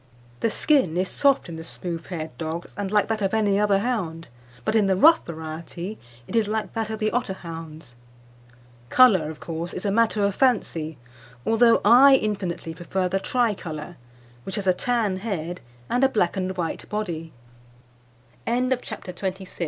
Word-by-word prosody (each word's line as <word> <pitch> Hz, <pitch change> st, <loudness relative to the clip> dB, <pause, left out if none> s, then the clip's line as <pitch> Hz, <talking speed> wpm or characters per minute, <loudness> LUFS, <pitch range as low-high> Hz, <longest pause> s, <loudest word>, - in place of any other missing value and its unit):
"The 230 Hz, -, +1 dB
skin 220 Hz, -, +2 dB
is 185 Hz, +1 st, 0 dB
soft 275 Hz, -5 st, +2 dB
in 165 Hz, -2 st, -7 dB
the 160 Hz, -, -7 dB
smooth 165 Hz, 0 st, -6 dB
haired 160 Hz, -3 st, -5 dB
dogs, 165 Hz, +1 st, -5 dB
and 200 Hz, -1 st, -3 dB
like 210 Hz, 0 st, +2 dB
that 220 Hz, -1 st, -2 dB
of 195 Hz, +2 st, +1 dB
any 205 Hz, -2 st, +2 dB
other 205 Hz, -1 st, +3 dB
hound, 195 Hz, -, -2 dB, 0.4 s
but 215 Hz, -, 0 dB
in 210 Hz, -3 st, +4 dB
the 190 Hz, -, +3 dB
rough 320 Hz, -, +6 dB
variety 170 Hz, +4 st, -6 dB, 0.3 s
it -, -, -6 dB
is 225 Hz, -2 st, +3 dB
like 215 Hz, 0 st, -2 dB
that 225 Hz, -1 st, -2 dB
of 220 Hz, -, -3 dB
the 215 Hz, 0 st, 0 dB
Otterhound's. 165 Hz, -, -5 dB, 0.9 s
"Colour, 190 Hz, -, +5 dB
of 155 Hz, -, -8 dB
course, 165 Hz, +1 st, -5 dB
is 185 Hz, -, -5 dB
a 200 Hz, -, +1 dB
matter 220 Hz, -1 st, +2 dB
of 200 Hz, -, +1 dB
fancy, 170 Hz, -, 0 dB, 0.5 s
although 230 Hz, +1 st, +4 dB
I 265 Hz, +5 st, +8 dB
infinitely 190 Hz, -8 st, -2 dB
prefer 180 Hz, +2 st, -2 dB
the 195 Hz, +2 st, 0 dB
tricolour, 190 Hz, -9 st, -2 dB, 0.4 s
which 190 Hz, -, -6 dB
has 205 Hz, -3 st, -3 dB
a 185 Hz, -, +4 dB
tan 215 Hz, -1 st, 0 dB
head 180 Hz, -4 st, -4 dB, 0.2 s
and 245 Hz, -, 0 dB
a 270 Hz, -, +6 dB
black 205 Hz, -8 st, +1 dB
and 185 Hz, -1 st, -1 dB
195 Hz, 155 wpm, -24 LUFS, 170-220 Hz, 0.9 s, I